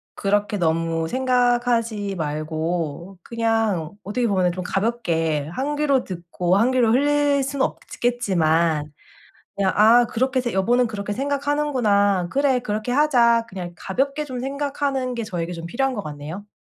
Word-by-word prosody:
그렇게 205 Hz, +1 st, 0 dB
너무 165 Hz, -1 st, 0 dB
생각하지 240 Hz, -4 st, +1 dB
말고 160 Hz, +3 st, -3 dB
그냥 225 Hz, -8 st, 0 dB
어떻게 235 Hz, +5 st, -1 dB
보면은 185 Hz, -4 st, +2 dB
좀 185 Hz, +1 st, -5 dB
가볍게 170 Hz, -8 st, -1 dB
1 280 Hz, +8 st, -2 dB
귀로 280 Hz, -4 st, +2 dB
듣고 175 Hz, 0 st, -1 dB
1 240 Hz, +5 st, +3 dB
귀로 245 Hz, -3 st, +3 dB
흘릴 285 Hz, +2 st, +2 dB
수는 275 Hz, 0 st, 0 dB
없겠지만 165 Hz, -10 st, 0 dB, 0.7 s
그냥 195 Hz, -1 st, +1 dB
'아 230 Hz, +3 st, +6 dB
그렇게 260 Hz, +3 st, 0 dB
해서 245 Hz, -2 st, -1 dB
여보는 240 Hz, +6 st, +2 dB
그렇게 205 Hz, -2 st, -4 dB
생각하는구나. 260 Hz, -9 st, +1 dB
그래 270 Hz, -2 st, +2 dB
그렇게 215 Hz, +1 st, -3 dB
하자.' 240 Hz, -5 st, +3 dB
그냥 180 Hz, -2 st, -7 dB
가볍게 275 Hz, -, -2 dB
좀 255 Hz, -3 st, -6 dB
생각하는 275 Hz, -1 st, -2 dB
게 235 Hz, -2 st, -3 dB
저에게 175 Hz, -4 st, -4 dB
좀 170 Hz, -1 st, -6 dB
필요한 265 Hz, +8 st, -1 dB
것 205 Hz, -, -4 dB
같네요. 155 Hz, +6 st, -7 dB
220 Hz, 310 characters per minute, -22 LUFS, 175-255 Hz, 0.7 s, 아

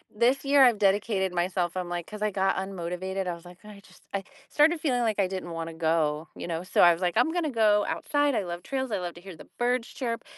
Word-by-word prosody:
this 250 Hz, +5 st, +2 dB
year, 280 Hz, -1 st, +6 dB
I've 240 Hz, -4 st, +5 dB
dedicated 195 Hz, -2 st, +1 dB
myself 175 Hz, 0 st, -1 dB
I'm 180 Hz, -1 st, -3 dB
like 175 Hz, -1 st, -3 dB
'cause 210 Hz, -1 st, -9 dB
I 215 Hz, -, +2 dB
got 195 Hz, -1 st, +1 dB
unmotivated, 190 Hz, 0 st, -4 dB
I 175 Hz, -, -2 dB
was 170 Hz, +1 st, -12 dB
like, 175 Hz, 0 st, -13 dB
"I 210 Hz, -1 st, -11 dB
just" -, -, -20 dB
I 195 Hz, -1 st, -2 dB, 0.2 s
started 310 Hz, +2 st, +3 dB
feeling 250 Hz, -6 st, 0 dB
like 220 Hz, -3 st, 0 dB
I 195 Hz, -, +4 dB
didn't 185 Hz, -1 st, -5 dB
wanna 165 Hz, 0 st, -5 dB
go, 160 Hz, -1 st, 0 dB
you -, -, -7 dB
know 165 Hz, 0 st, -3 dB
so 185 Hz, -, +1 dB
I 175 Hz, -1 st, +8 dB
was 170 Hz, -, -7 dB
like, 180 Hz, +3 st, 0 dB
"I'm 285 Hz, +7 st, +3 dB
gonna 335 Hz, -3 st, -1 dB
go 215 Hz, -4 st, +3 dB
outside. 290 Hz, -3 st, 0 dB
I 200 Hz, -, 0 dB
love 175 Hz, 0 st, -5 dB
trails, 265 Hz, +2 st, -3 dB
I 200 Hz, -, 0 dB
love 175 Hz, -1 st, -5 dB
to 175 Hz, -, -12 dB
hear 190 Hz, -3 st, -10 dB
the -, -, -14 dB
birds 245 Hz, 0 st, 0 dB
chirp. 235 Hz, -3 st, -4 dB
195 Hz, 255 wpm, -27 LUFS, 175-235 Hz, 0.2 s, I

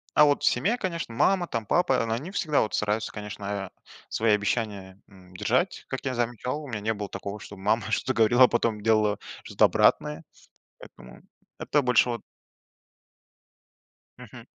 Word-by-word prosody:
а 150 Hz, -, +7 dB
вот 145 Hz, -1 st, +1 dB
в -, -, +2 dB
семье, 190 Hz, -, +2 dB
конечно, 170 Hz, -, -4 dB
мама, 185 Hz, +6 st, +2 dB
там, 115 Hz, -6 st, -3 dB
папа, 175 Hz, -, +2 dB
они 145 Hz, +11 st, -5 dB
всегда 155 Hz, -7 st, +1 dB
вот 110 Hz, -, -2 dB
стараются, 105 Hz, +1 st, -1 dB
конечно, 105 Hz, -1 st, -7 dB
э, 100 Hz, -2 st, -4 dB, 0.4 s
свои 110 Hz, -1 st, +1 dB
обещания, 100 Hz, -2 st, -3 dB
м, 95 Hz, -2 st, -18 dB
держать, -, -, 0 dB
как -, -, -5 dB
я 130 Hz, -, -1 dB
замечал. 120 Hz, +5 st, -2 dB
У -, -, -9 dB
меня 110 Hz, -4 st, -4 dB
не 110 Hz, +1 st, 0 dB
было 105 Hz, -1 st, -6 dB
такого, 100 Hz, +1 st, -6 dB
чтобы 100 Hz, -1 st, -11 dB
мама 110 Hz, +2 st, +2 dB
что-то 130 Hz, -, 0 dB
говорила, 120 Hz, +3 st, +5 dB
а -, -, +3 dB
потом 115 Hz, -3 st, 0 dB
делала 105 Hz, -2 st, +2 dB, 0.2 s
что-то -, -, +3 dB
обратное. 75 Hz, +1 st, +2 dB, 0.6 s
Поэтому 65 Hz, -, -14 dB, 0.4 s
это 145 Hz, -, +1 dB
больше 125 Hz, -1 st, +3 dB
вот 115 Hz, -2 st, -4 dB, 2.0 s
Мгм. -, -, -12 dB
110 Hz, 165 wpm, -26 LUFS, 105-130 Hz, 2.0 s, а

